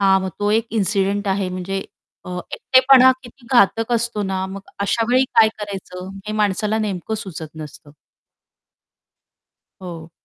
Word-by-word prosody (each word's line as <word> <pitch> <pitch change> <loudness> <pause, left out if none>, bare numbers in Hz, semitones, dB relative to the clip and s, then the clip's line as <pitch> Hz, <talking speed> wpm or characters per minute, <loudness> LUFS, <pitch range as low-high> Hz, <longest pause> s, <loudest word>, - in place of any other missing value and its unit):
हां, 190 -1 +4
मग 190 0 -3
तो 205 0 +1
एक 225 +1 +2
इन्सिडेंट 200 0 0
आहे 195 -1 0
म्हणजे 190 +1 -4 0.4
अ, - - -6 0.2
एकटेपणा 260 0 +6
किती 240 0 -15
घातक 225 0 +3
असतो 235 -2 0
ना, 190 -1 -2
मग 195 +1 -7 0.2
अशावेळी 235 +5 +2
काय 220 - +8
करायचं 190 -3 -7 0.2
हे 215 - -3
माणसाला 210 +2 0
नेमकं 205 -1 -3
सुचत 175 -7 -6
नसतं. 150 -1 -10 1.9
हो. 170 -3 -8
200 Hz, 135 wpm, -20 LUFS, 190-225 Hz, 1.9 s, काय